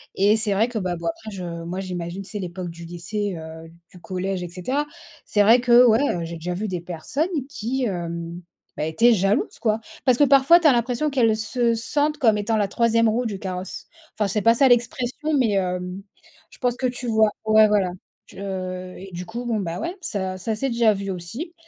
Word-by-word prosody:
Et 205 +3 +4
c'est 215 -2 +1
vrai 220 +5 +2
que, 240 - -4
bah, 180 -3 -2
bon, 170 0 -5
après 215 +6 -5
je 190 -3 -6 0.2
moi, 180 +3 -4
j'imagine, 180 0 -5
tu 195 - -11
sais, 210 - -5
l'époque 180 -1 -5
du 170 0 -10
lycée, 180 +3 -4
heu, 160 0 -9 0.2
du 180 - -13
collège, 185 +1 -3
et 175 - -4
cetera. 255 - -2 0.4
C'est 205 - +3
vrai 230 +4 +6
que, 245 0 +6
ouais, 225 0 +5
heu, 180 -12 0
j'ai 170 +1 -6
déjà 175 +2 -4
vu 205 +4 -3
des 180 -1 -2
personnes 175 - -3 0.2
qui, 260 -1 -3
hem, 170 -3 -4 0.4
bah, 150 - -1
étaient 230 +10 +4
jalouses, 195 +2 0
quoi. 220 -1 0 0.2
Parce 255 -2 +4
que, 290 - +5
parfois, 280 +5 +6
tu 320 - +5
as 290 - +7
l'impression 245 +5 0
qu'elles 230 -5 +3
se 230 +2 0
sentent 290 +6 0
comme 225 -7 +3
étant 210 +2 0
la 205 -2 +1
troisième 230 +1 +3
roue 240 +3 0
du 205 -4 -3
carrosse. 185 -1 -6 0.3
Enfin, 210 -2 -1
c'est 210 +3 0
pas 230 +2 +5
ça 265 +3 +4
l'expression, 245 +5 0
mais, 240 -5 +2
hem, 180 0 -2 0.5
je - - -16
pense 245 -1 0
que 260 -1 0
tu 245 0 -5
vois. 220 -1 +3
Ouais, 215 0 +6
voilà. 200 -4 +2 0.4
Tu, - - -13
heu 185 -2 -5
et, 195 +1 -10
du 175 +1 -6
coup, 235 +5 -6
bon, 225 -3 0
bah, 175 -2 -3
ouais, 350 - -4
ça 190 - -3
ça 220 +4 -2
s'est 270 +5 -1
déjà 235 -2 +3
vu 195 0 -5
aussi. 195 - -6
210 Hz, 220 wpm, -23 LUFS, 180-240 Hz, 0.5 s, as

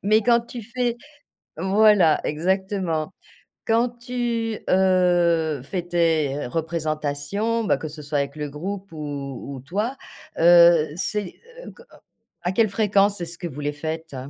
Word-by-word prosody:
Mais 215 +2 +4
quand 235 +1 +4
tu 235 0 -9
fais 240 +1 -2 0.6
voilà, 195 -2 +4
exactement. 185 0 -1 0.5
Quand 230 +2 +2
tu, 240 -2 -3
heu, 175 -5 +3
fais 175 +6 -3
tes 160 -5 0
représentations, 160 - -2
bah, - - +2
que 155 - -6
ce 150 0 -9
soit 145 0 -1
avec 140 0 -3
le 150 -1 -4
groupe 190 +6 -6
ou 140 -3 -6
ou - - -8
toi, 210 - -3 0.4
heu, 170 -1 +7
c'est 200 +1 -3 0.3
heu - - -9
co 475 - -17 0.6
à 180 - 0
quelle 220 +1 +3
fréquence 200 -1 +2
est-ce 170 0 -5
que 175 - -4
vous 145 -2 -9
les 145 0 -2
faites? 160 0 -5
175 Hz, 145 wpm, -23 LUFS, 155-210 Hz, 0.6 s, heu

